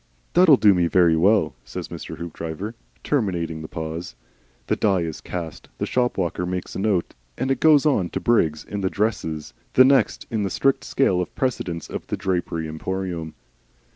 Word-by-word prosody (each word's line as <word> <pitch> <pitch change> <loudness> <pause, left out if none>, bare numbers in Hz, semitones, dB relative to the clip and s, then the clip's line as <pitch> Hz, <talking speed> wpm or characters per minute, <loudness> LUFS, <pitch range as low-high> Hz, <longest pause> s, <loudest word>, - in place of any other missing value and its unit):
"That'll 170 -6 +7
do 105 -4 +6
me 90 -2 +2
very 85 -2 +4
well," 90 -3 +3
said 65 - -6
Mr. 80 - -8
Hoopdriver, 85 +4 -5 0.3
terminating 85 - -1
the 80 - -6
pause. 80 +2 -6 0.5
The - - +1
die 95 -4 +2
is 80 -2 -4
cast. 85 -3 -6
The - - -1
shop 125 -1 0
walker 90 -1 -1
makes 90 0 -4
a - - -3
note 95 -3 0 0.2
of 130 +2 -1
it - - +2
and 135 - 0
goes 155 -2 +5
on 100 - +2
to - - -3
Briggs 80 -11 +2
in 100 -1 -5
the 95 - +1
"dresses," 80 -8 -2 0.2
the 130 - +7
next 135 0 +3
in 110 -2 0
the 100 - 0
strict 135 +8 +1
scale 95 -10 +2
of 90 - -6
precedence 90 - -2
of - - -6
the - - -2
Drapery 85 -3 -2
Emporium. 85 0 -4
90 Hz, 185 wpm, -23 LUFS, 80-110 Hz, 0.5 s, That'll